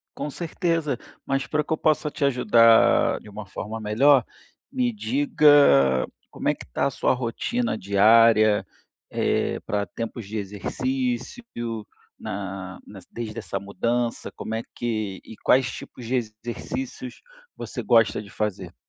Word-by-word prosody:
Com - - -4
certeza, 165 -3 -1 0.3
mas 135 -2 -1
para 150 0 0
que 160 - -2
eu - - -1
possa 155 -1 +1
te 140 - -4
ajudar 120 -4 +5
de - - -16
uma 105 0 -8
forma 105 +4 -6
melhor, 125 +5 +4 0.5
me 250 -3 0
diga 145 - +4 0.2
como - - -5
é - - +3
que - - -11
está - - -1
a - - +1
sua - - +1
rotina 130 - -2
diária, 110 +2 +5 0.4
eh, - - 0
para 100 -2 -1
tempos 115 +1 -6
de 110 +2 -5
exercício, 125 - -3 0.8
na 95 -1 -6
na 100 - -11
desde 115 -1 -5
essa 100 -3 -4
mudança, 115 +4 -2
como 110 - -6
é 110 - -1
que 110 -5 -3
e 110 - -10
quais 130 -1 +4
tipos 120 - -10
de 125 +3 -1
exercícios 120 - -5 0.4
você - - -5
gosta 115 -2 +3
de 100 - -12
fazer? 95 -4 -4
115 Hz, 145 wpm, -24 LUFS, 105-140 Hz, 0.8 s, ajudar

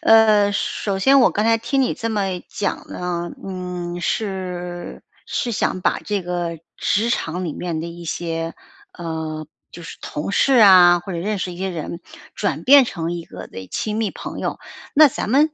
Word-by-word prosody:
呃， 215 -2 +6
首 200 -1 -2
先 270 +8 +5
我 - - +5
刚 210 - 0
才 225 0 +4
听 255 +4 0
你 255 - +1
这 230 - -3
么 195 -4 -1
讲 200 - -3
呢， 175 -1 -3
嗯， 180 -2 -5
是 180 -3 -4 0.2
是 240 - -2
想 185 - 0
把 - - +1
这 205 -2 -2
个 175 -2 -3 0.2
职 220 +3 +1
场 180 -4 -1
里 165 - -3
面 170 -1 -4
的 165 - -4
一 170 0 -9
些， 165 0 -3 0.4
呃， 160 -2 -5 0.2
就 175 - -10
是 165 - -9
同 150 +6 -4
事 275 - +3
啊， 185 -6 +8
或 190 +2 -7
者 170 - -3
认 205 +4 -2
识 185 -1 -3
一 175 - -10
些 190 +1 -2
人 170 0 -5 0.3
转 - - -2
变 280 +1 +8
成 170 -7 -3
一 170 -1 -5
个 90 - -9
的 95 0 -9
亲 210 - -2
密 220 -2 0
朋 - - -7
友。 - - -3 0.4
那 305 0 +8
咱 245 - -4
们， 295 +5 +4
180 Hz, 200 characters per minute, -21 LUFS, 170-215 Hz, 0.4 s, 啊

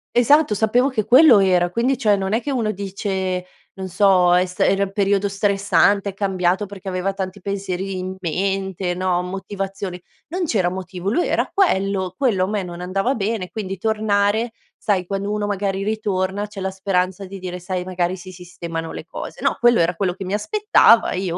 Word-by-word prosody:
Esatto, 245 0 +4
sapevo 235 +5 +2
che 220 -6 -1
quello 255 0 +7
era. 180 -2 +3
Quindi, 240 +7 0
cioè, 215 -5 +3
non 195 0 -2
è 225 - +1
che 285 - -3
uno 230 -5 0
dice, 190 -2 -3 0.3
non 190 -1 -6
so: 185 -1 +4
"È 180 +1 +3
sta 180 0 -1
era 195 0 +2
un 195 - -4
periodo 200 0 +1
stressante, 200 0 +2
è - - -7
cambiato 190 0 0
perché 200 0 -11
aveva 185 +1 -1
tanti 190 0 -5
pensieri 195 -1 -3
in 185 +1 -5
mente, 190 +1 -2
no, 180 -1 0
motivazioni." 195 0 -5 0.3
Non 355 +2 -2
c'era 195 - +1
motivo: 185 +1 -4
lui 350 +10 +1
era - - +1
quello, 195 - +1
quello 215 -9 +2
a - - -5
me 205 -1 -2
non 175 -1 -8
andava 195 +7 0
bene, 205 -4 -2
quindi 195 -3 -5
tornare, 215 +2 +1 0.2
sai, 195 -4 0
quando 195 +2 -3
uno 210 0 -1
magari 195 -1 -2
ritorna 205 -1 -1
c'è 205 -1 -9
la 190 0 -2
speranza 190 0 -1
di 195 +1 -8
dire: 180 -1 -6
"Sai, 180 0 -3
magari, 180 0 -1
si 185 +1 -10
sistemano 170 -2 -6
le - - -7
cose." - - -8
No, - - +1
quello 240 -1 +5
era 170 +2 +2
quello 185 0 -1
che 195 - -7
mi 185 - -4
aspettava 320 - +4
e 185 - -2
io 180 -3 -2
195 Hz, 195 wpm, -21 LUFS, 185-210 Hz, 0.3 s, quello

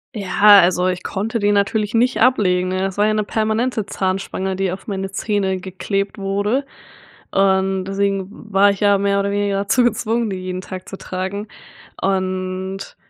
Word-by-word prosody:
Ja, 205 0 +6
also 180 +1 +2
ich 185 0 -2
konnte 215 +4 -2
den 205 0 +2
natürlich 205 +1 0
nicht 245 +2 +2
ablegen 185 -7 +3
ne? 185 +1 -1
Es 195 0 -4
war 205 +1 +3
ja 215 - +2
'ne 215 0 +1
permanente 220 +1 -1
Zahnspange 190 0 -2
die 190 -1 -1
auf 190 - -8
meine 195 -2 -3
Zähne 195 -2 -1
geklebt 195 +2 -3
wurde 205 +7 -1 0.7
und 190 -1 +2
deswegen 195 -1 -1 0.2
war 200 +1 +6
ich 200 - -5
ja 205 -1 +4
mehr 200 0 +1
oder 200 0 -1
weniger 200 -1 0
dazu 220 +5 +2
gezwungen, 235 -1 0
die 190 - -3
jeden 185 0 -5
Tag 185 -1 -8
zu 195 - -7
tragen. 190 +3 -5 0.5
Und 185 0 -2
195 Hz, 170 wpm, -19 LUFS, 190-205 Hz, 0.7 s, Ja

